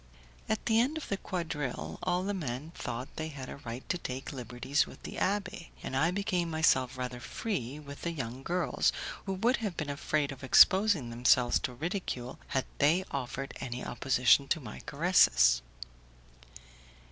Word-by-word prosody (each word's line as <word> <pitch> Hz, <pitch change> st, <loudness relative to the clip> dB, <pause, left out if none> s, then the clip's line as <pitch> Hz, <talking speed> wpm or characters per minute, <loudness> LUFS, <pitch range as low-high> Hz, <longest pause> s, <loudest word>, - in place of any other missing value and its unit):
At 220 Hz, -, -1 dB
the 225 Hz, -1 st, +4 dB
end 270 Hz, +7 st, +2 dB
of 315 Hz, -, -6 dB
the 200 Hz, -, 0 dB
quadrille 155 Hz, -9 st, -4 dB
all 180 Hz, 0 st, 0 dB
the 205 Hz, +2 st, -1 dB
men 150 Hz, -4 st, -4 dB
thought 125 Hz, -3 st, -6 dB
they 155 Hz, -, -2 dB
had 140 Hz, -4 st, -7 dB
a -, -, -7 dB
right 120 Hz, -1 st, -7 dB
to 180 Hz, -, 0 dB
take 130 Hz, -1 st, -5 dB
liberties 125 Hz, +3 st, -1 dB
with -, -, -13 dB
the -, -, -7 dB
abbé, 190 Hz, -4 st, -1 dB, 0.2 s
and -, -, -4 dB
I 155 Hz, +5 st, +3 dB
became 180 Hz, -2 st, 0 dB
myself 130 Hz, -6 st, +2 dB
rather 125 Hz, -1 st, -4 dB
free 130 Hz, -, -3 dB
with 145 Hz, -1 st, -10 dB
the 170 Hz, -, -1 dB
young 130 Hz, -6 st, -5 dB
girls, 170 Hz, -2 st, +1 dB, 0.4 s
who 195 Hz, -, 0 dB
would 230 Hz, +7 st, +2 dB
have 205 Hz, -6 st, -4 dB
been 150 Hz, -2 st, -2 dB
afraid 145 Hz, 0 st, 0 dB
of 135 Hz, -1 st, -10 dB
exposing 185 Hz, -, +6 dB
themselves 120 Hz, +1 st, +4 dB
to 125 Hz, -, -3 dB
ridicule 150 Hz, -5 st, -4 dB
had 135 Hz, -, 0 dB
they 165 Hz, +6 st, +4 dB
offered 135 Hz, 0 st, -4 dB
any 125 Hz, 0 st, -5 dB
opposition 130 Hz, +2 st, +3 dB
to 160 Hz, -, +1 dB
my 120 Hz, -7 st, -8 dB
caresses. 65 Hz, -, +5 dB
145 Hz, 170 wpm, -31 LUFS, 125-180 Hz, 0.4 s, exposing